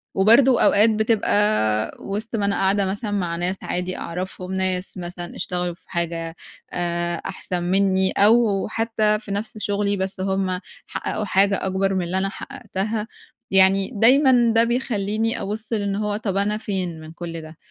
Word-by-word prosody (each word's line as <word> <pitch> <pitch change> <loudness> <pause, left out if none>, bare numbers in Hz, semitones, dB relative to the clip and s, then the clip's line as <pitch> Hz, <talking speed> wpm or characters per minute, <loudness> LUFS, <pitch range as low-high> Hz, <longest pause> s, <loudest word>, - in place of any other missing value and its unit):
وبرضه 235 +6 +5
أوقات 210 +3 +5
بتبقى 210 - +1
وسط 210 +4 -4
ما 205 - 0
أنا 200 0 +1
قاعدة 195 +1 +2
مثلًا 205 +3 -3
مع 180 -4 -1
ناس 180 +2 -1
عادي 180 +1 -3
أعرفهم، 185 +1 -5
ناس 185 0 -2
مثلًا 175 -1 -7
اشتغلوا 180 -1 -2
في - - -29
حاجة 170 -2 -3 0.4
آآ 175 0 -1
أحسن 180 -2 -3
مني، 190 +1 +2
أو 210 -1 +3
حتّى 215 -1 +1
في 210 -2 -9
نفْس 215 +3 -4
شُغلي 205 -1 0
بس 190 0 -2
هُم 190 -1 -1 0.3
حققوا 215 - -3
حاجة 195 0 +2
أكبر 195 +1 0
من 185 - 0
اللي 180 +2 -2
أنا 195 +1 0
حققتها، 210 +3 -4 0.4
يعني 190 +1 +4
دايمًا 245 +1 +5
ده 230 - +6
بيخلّيني 225 -3 -1
أبُصّ 215 +3 -4
لإن 200 -2 -1
هو 210 0 -1
طب 195 -3 -2
أنا 210 +1 +1
فين 185 -6 -3
من 155 0 -10
كلّ 165 -1 -7
ده؟ 155 0 -12
195 Hz, 160 wpm, -22 LUFS, 180-215 Hz, 0.4 s, ده